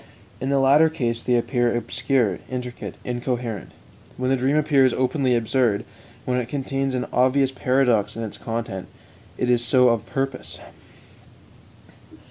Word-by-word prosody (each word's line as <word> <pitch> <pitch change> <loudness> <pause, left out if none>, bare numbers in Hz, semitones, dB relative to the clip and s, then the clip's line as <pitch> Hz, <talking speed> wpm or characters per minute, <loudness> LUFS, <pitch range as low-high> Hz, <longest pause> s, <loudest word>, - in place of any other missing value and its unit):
In 130 - -3
the 140 - +2
latter 140 +4 +5
case 120 -7 -2
they 125 - +1
appear 120 0 +1
obscure, 120 - 0
intricate, 125 -1 -6
incoherent. 120 -3 -3 0.5
When 130 +1 0
the - - +4
dream 135 +3 +1
appears 140 -4 +3
openly 130 -1 +1
absurd, 115 -2 +1 0.4
when 125 0 0
it 120 - -3
contains 135 -1 -2
an 125 - -1
obvious 130 +2 +3
paradox 125 -5 +1
in 115 - -4
its 110 - -7
content, 115 -5 -4 0.5
it 125 - -1
is 120 -1 +3
so 125 +1 +4
of 115 -1 0
purpose. 135 -1 -4
125 Hz, 140 wpm, -23 LUFS, 120-135 Hz, 0.5 s, latter